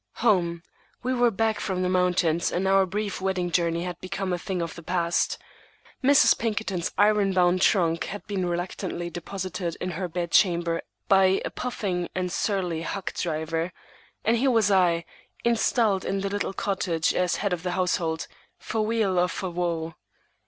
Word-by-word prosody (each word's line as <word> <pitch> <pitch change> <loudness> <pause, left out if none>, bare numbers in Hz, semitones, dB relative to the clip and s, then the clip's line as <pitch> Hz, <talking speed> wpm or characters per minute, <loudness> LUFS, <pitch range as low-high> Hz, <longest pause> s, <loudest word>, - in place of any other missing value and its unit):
Home! 170 -6 +2 0.4
We 255 +1 0
were 245 -1 +4
back 220 0 0
from 185 -3 -2
the - - +1
mountains, 180 -2 +2
and 190 +2 0
our 195 0 +4
brief 200 +1 -3
wedding 185 -2 -1
journey 170 -1 +1
had 180 -1 -6
become 190 0 -3
a 175 - -1
thing 190 0 -3
of 165 -1 -3
the 170 - -10
past. 170 0 0 0.7
Mrs. 280 +2 +6
Pinkerton's 210 -6 -1
iron 205 -1 +4
bound 180 0 +3
trunk 165 -5 +3
had 205 - -7
been 190 -4 -2
reluctantly 175 0 -3
deposited 180 -1 -4
in 185 - -3
her 180 +2 -3
bed 170 0 -3
chamber 170 -3 +3 0.3
by 190 -1 +5
a - - -3
puffing 190 -8 -3
and 180 -1 -1
surly 180 -5 -1
hack 195 +3 -4
driver; 165 +1 -2 0.5
and 230 +2 +3
here 265 +3 +2
was 225 -4 +3
I, 175 -3 +3 0.4
installed 230 -3 +2
in 195 0 -1
the 195 - -1
little 205 -1 -2
cottage 180 -5 0
as 180 -1 +1
head 200 -3 -1
of 175 - -2
the 180 0 -2
household, 170 -3 0 0.3
for 220 - -2
weal 215 -4 +1
or 180 - +3
for 185 0 -4
woe. 170 -2 -2
185 Hz, 170 wpm, -26 LUFS, 170-200 Hz, 0.7 s, Mrs